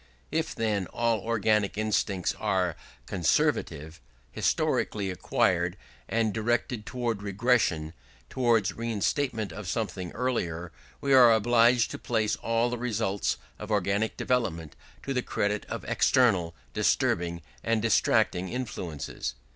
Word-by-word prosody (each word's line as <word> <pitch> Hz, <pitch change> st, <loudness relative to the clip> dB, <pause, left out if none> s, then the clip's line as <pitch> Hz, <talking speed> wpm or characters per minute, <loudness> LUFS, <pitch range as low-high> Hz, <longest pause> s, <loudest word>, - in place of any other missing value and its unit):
"If, 160 Hz, 0 st, -1 dB
then, 105 Hz, -4 st, 0 dB
all 115 Hz, -2 st, 0 dB
organic 105 Hz, -1 st, +1 dB
instincts 105 Hz, -3 st, 0 dB
are 90 Hz, -3 st, 0 dB, 0.3 s
conservative, 80 Hz, -2 st, 0 dB, 0.3 s
historically 100 Hz, -3 st, 0 dB
acquired, 90 Hz, -, +1 dB, 0.3 s
and 110 Hz, -2 st, +1 dB
directed 115 Hz, 0 st, -1 dB
towards 120 Hz, -5 st, -2 dB
regression, 100 Hz, -7 st, +1 dB, 0.3 s
towards 115 Hz, -, +2 dB
reinstatement 115 Hz, -, -1 dB
of 105 Hz, 0 st, -7 dB
something 95 Hz, -3 st, -3 dB
earlier, 90 Hz, -9 st, -2 dB, 0.3 s
we 140 Hz, -1 st, +2 dB
are 125 Hz, -3 st, +8 dB
obliged 115 Hz, +2 st, +4 dB
to -, -, -6 dB
place 110 Hz, -3 st, 0 dB
all 115 Hz, +1 st, 0 dB
the 125 Hz, -, -3 dB
results 110 Hz, -4 st, -1 dB, 0.2 s
of -, -, -7 dB
organic 105 Hz, +1 st, 0 dB
development 85 Hz, -, -1 dB, 0.3 s
to 135 Hz, -, -2 dB
the 125 Hz, -, +1 dB
credit 105 Hz, -3 st, -1 dB
of -, -, -5 dB
external, 95 Hz, -10 st, +2 dB, 0.2 s
disturbing, 85 Hz, 0 st, +1 dB, 0.2 s
and 115 Hz, -1 st, +1 dB
distracting 95 Hz, -4 st, +2 dB
influences. 90 Hz, -, -5 dB
110 Hz, 115 wpm, -28 LUFS, 95-120 Hz, 0.3 s, are